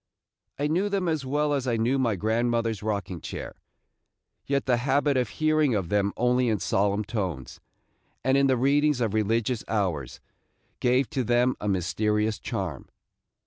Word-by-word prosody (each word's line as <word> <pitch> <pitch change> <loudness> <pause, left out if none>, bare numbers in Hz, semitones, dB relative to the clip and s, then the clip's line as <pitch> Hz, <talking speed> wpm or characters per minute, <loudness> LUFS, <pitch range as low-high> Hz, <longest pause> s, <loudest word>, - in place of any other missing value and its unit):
I 145 - -1
knew 180 +7 +1
them 195 -3 -1
as 155 -5 -1
well 145 +2 +1
as 135 -2 -1
I 120 -2 +1
knew 120 +5 +1
my 115 -5 +1
grandmother's 115 +1 0
rocking 100 -5 -3
chair, - - -6 0.9
yet 140 -1 0
the 125 -2 +2
habit 140 +3 +1
of 125 -1 +1
hearing 155 -5 +2
of 95 -5 -2
them 100 -1 +1
only 125 0 +2
in 110 - +1
solemn 100 +2 0
tones, 95 - -4 0.6
and 130 +2 +3
in 140 0 +4
the 130 -1 +2
readings 145 +2 +2
of 115 -4 0
religious 110 +2 0
hours, 85 - -2 0.6
gave 125 +1 +2
to 135 -4 -1
them 120 +2 +2
a 105 - -3
mysterious 105 +4 0
charm. - - -5
120 Hz, 160 wpm, -26 LUFS, 105-135 Hz, 0.9 s, in